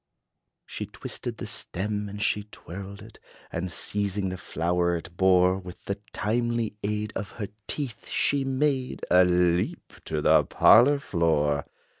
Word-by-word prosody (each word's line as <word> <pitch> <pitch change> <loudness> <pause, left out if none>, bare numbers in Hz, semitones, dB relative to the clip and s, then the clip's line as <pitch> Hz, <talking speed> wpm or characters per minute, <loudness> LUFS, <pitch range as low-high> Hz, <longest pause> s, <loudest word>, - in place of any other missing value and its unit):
She - - -5
twisted - - -6
the - - -5
stem, 105 +2 -3
and 105 +1 -7
she 105 -1 0
twirled 100 -1 -9
it; - - -14 0.3
And, 90 +2 -3
seizing 100 +1 -1
the 90 - -4
flower 85 +2 0
it 85 +1 -7
bore 95 0 +4
With 90 -2 -11
the 100 0 -3
timely 115 0 -1
aid 105 +1 -2
of 95 0 -5
her 105 -4 -5 0.2
teeth, 125 -7 -5
she 140 -1 +1
made 135 -1 -1
A 90 +1 +7
leap 90 0 +1
to 80 - -2
the - - +5
parlor 140 +6 +6
floor. 80 - +1
100 Hz, 145 wpm, -27 LUFS, 90-110 Hz, 0.3 s, A